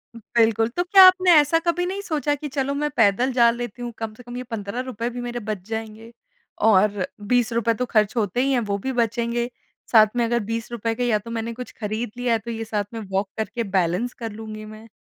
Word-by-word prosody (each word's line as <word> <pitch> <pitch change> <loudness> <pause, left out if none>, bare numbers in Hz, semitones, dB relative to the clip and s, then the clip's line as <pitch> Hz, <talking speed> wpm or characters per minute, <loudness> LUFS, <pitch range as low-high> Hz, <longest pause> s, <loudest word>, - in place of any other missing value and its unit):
उ - - -9 0.2
बिल्कुल। 225 -1 +3
तो 350 +9 -1
क्या 380 +1 +7
आपने 370 -1 +5
ऐसा 295 +3 +3
कभी 350 +1 +1
नहीं 385 +2 -3
सोचा 300 -6 -1
कि 295 +1 -6
चलो, 280 0 -1
मैं 295 +1 -1
पैदल 225 +4 +3
जा 235 -1 +5
लेती 240 0 -6
हूँ, 240 0 -4
कम 225 -1 -5
से 245 - -14
कम 240 +1 -8
ये 250 - -4
₹15 235 +1 -4
भी 245 0 -6
मेरे 240 0 -4
बच 215 -1 -4
जाएँगे, 225 0 -6 0.5
और 205 -2 +3 0.2
₹20 235 0 +1
तो 250 +3 -2
खर्च 215 -2 +1
होते 215 +2 0
ही 275 +1 +1
हैं, 260 - +3
वो 205 -3 -2
भी 265 +7 -3
बचेंगे। 235 0 -1 0.4
साथ 220 -2 +7
में 240 -1 +2
अगर 235 +1 +1
₹20 230 0 -2
के 245 - -2
या 215 -3 +3
तो 230 +3 -10
मैंने 230 0 -3
कुछ 250 +1 -8
खरीद 215 +1 -3
लिया 245 -1 +1
है, 225 - +1
तो 235 +2 -7
ये 225 0 -4
साथ 210 -2 -2
में 230 - -4
वॉक 195 +1 0
करके 220 +2 -2
बैलेंस 190 +3 0
कर 225 -2 -6
लूँगी 215 0 -8
मैं। 215 +1 -12
230 Hz, 225 wpm, -23 LUFS, 215-245 Hz, 0.5 s, क्या